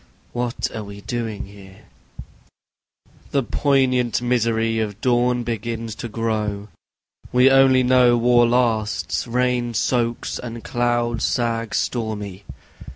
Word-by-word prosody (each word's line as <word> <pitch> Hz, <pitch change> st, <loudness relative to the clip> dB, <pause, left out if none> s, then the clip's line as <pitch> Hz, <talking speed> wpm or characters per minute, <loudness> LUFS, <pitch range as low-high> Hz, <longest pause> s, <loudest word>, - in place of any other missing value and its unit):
What 120 Hz, 0 st, -2 dB
are 110 Hz, -, -4 dB
we 100 Hz, 0 st, -10 dB
doing 115 Hz, -2 st, -4 dB
here? 100 Hz, -1 st, -15 dB, 1.5 s
The 140 Hz, -2 st, +1 dB
poignant 130 Hz, -2 st, +1 dB
misery 115 Hz, -2 st, 0 dB
of 105 Hz, -2 st, -3 dB
dawn 125 Hz, 0 st, +1 dB
begins 115 Hz, -1 st, -4 dB
to -, -, -5 dB
grow... 105 Hz, -2 st, -2 dB, 0.6 s
We 125 Hz, +2 st, +5 dB
only 135 Hz, -1 st, +5 dB
know 125 Hz, -1 st, +4 dB
war 120 Hz, 0 st, +4 dB
lasts, 110 Hz, -6 st, 0 dB
rain 120 Hz, -1 st, 0 dB
soaks, 120 Hz, 0 st, -1 dB
and 115 Hz, -1 st, -7 dB
clouds 120 Hz, -1 st, 0 dB
sag 115 Hz, -2 st, -1 dB
stormy. 105 Hz, -5 st, -3 dB
120 Hz, 110 wpm, -21 LUFS, 110-125 Hz, 1.5 s, We